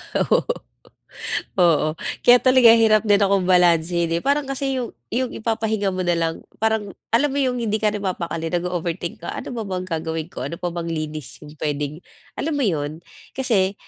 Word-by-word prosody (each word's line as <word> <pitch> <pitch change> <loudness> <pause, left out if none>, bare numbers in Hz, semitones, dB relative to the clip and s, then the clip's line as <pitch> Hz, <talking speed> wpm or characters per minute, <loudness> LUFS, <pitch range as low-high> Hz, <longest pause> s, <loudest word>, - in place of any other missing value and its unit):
Ah, - - +3
oo. - - +6 1.2
Oo, 160 -3 +4 0.3
kaya 245 0 +8
talaga 255 -3 +7
hirap 220 -2 +4
din 205 -1 +4
akong 195 -1 +3
balansehin, 170 -1 +3
eh, - - -13
parang 280 0 +1
kasi 270 0 -1
'yung 240 - -4 0.2
'yung 250 +1 -1
ipapahinga 220 -2 -1
mo 185 0 -3
na 175 - +2
lang, 165 -1 0 0.3
parang 220 -2 +1 0.2
alam 285 +6 +4
mo 280 - -3
'yung 255 -2 +1
hindi 215 -2 0
ka 210 0 +2
na 210 - -4
mapakali, 170 -4 -3
nag-o-overthink 175 0 -3
ka, - - -3
"Ano - - -6
pa 225 - -3
bang 185 -1 -3
gagawin 160 -1 -3
ko, - - -5
ano 170 - -5
pa 175 +1 -3
bang 170 -1 -4
linis 155 -3 -4
'yung 150 0 -11
puwedeng?" 150 +1 -2 0.4
alam 320 - -1
mo 285 - 0
'yun, 150 -7 -1 0.4
kasi, 210 -8 +1
185 Hz, 185 wpm, -22 LUFS, 165-225 Hz, 1.2 s, kaya